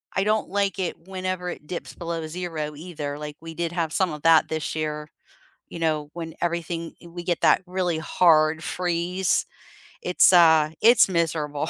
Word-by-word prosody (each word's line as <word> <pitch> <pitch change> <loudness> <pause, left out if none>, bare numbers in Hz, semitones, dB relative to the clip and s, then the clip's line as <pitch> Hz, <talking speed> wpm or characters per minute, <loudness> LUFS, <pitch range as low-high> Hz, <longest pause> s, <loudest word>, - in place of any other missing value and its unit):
I 195 - +2
don't 215 +1 0
like 200 0 -1
it 175 -1 -4
whenever 185 -1 -3
it 150 - -8
dips 180 - -6
below 165 -1 -4
0 155 -3 -5
either, 150 -3 -6
like, 150 0 -7
we 165 0 -8
did 170 0 -3
have 165 -2 -2
some 185 -4 +1
of 150 0 -9
that 165 -1 +5
this 160 -1 -3
year, 150 -1 -3 0.6
you 170 - -8
know, 155 -2 -1
when 165 -1 -7
everything 170 -1 -3
i - - -11
we 175 +1 -8
get 175 -1 -1
that - - +4
really 180 -3 -1
hard 160 -1 +3
freeze. 180 +1 0 0.6
It's, 180 +1 +4
uh 160 -3 +6
It's 230 -1 +6
miserable. 155 -3 -1
170 Hz, 175 wpm, -24 LUFS, 155-180 Hz, 0.6 s, uh